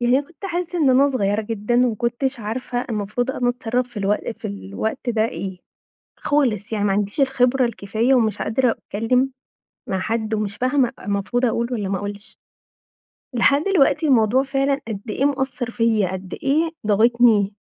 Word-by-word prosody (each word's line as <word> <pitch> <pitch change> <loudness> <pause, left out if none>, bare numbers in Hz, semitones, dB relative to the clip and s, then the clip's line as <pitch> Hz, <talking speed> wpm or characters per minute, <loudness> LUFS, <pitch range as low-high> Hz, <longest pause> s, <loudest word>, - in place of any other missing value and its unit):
يعني 245 +2 +3
أنا 285 - -5
كنت 345 +4 -9
حاسة 350 0 -3
إن 280 -4 +4
أنا 275 +3 +4
صغيرة 210 -4 0
جدًا 220 +2 -2
وما 230 - -1
كنتش 240 +3 -2
عارفة 245 +3 -3
المفروض 215 +4 -1
أنا 245 -2 -1
أتصرف 245 0 -1
في 240 - -20
الوق 205 +3 0
في - - -7
الوقت 100 - -4
ده 220 -1 +1
إيه، 185 +2 -6 0.6
خالص، 225 -8 0
يعني 205 -1 0
ما 200 - +2
عنديش 205 +6 -1
الخبرة 260 -1 +3
الكفاية 225 +3 0
ومش 225 -4 +2
قادرة 235 +2 +1
أتكلم 250 +7 0 0.6
مع 190 - -1
حد 220 +2 -2
ومش 205 -1 -3
فاهمة 255 -1 +2
المفروض 205 +5 -1
أقول 235 0 0
والّا 205 -4 -2
ما 195 - 0
أقولش. 205 +2 -7 1.0
لحد 280 +5 +3
دلوقتي 335 -4 +3
الموضوع 250 -1 +4
فعلًا 275 +1 0
قد 210 -3 -4
إيه 265 - -1
مأثر 265 -3 -1
فيَّ، 225 -4 +2
قد 185 0 -6
إيه 315 +4 +2 0.2
ضاغطني. 220 -1 +4
235 Hz, 165 wpm, -21 LUFS, 210-265 Hz, 1.0 s, إن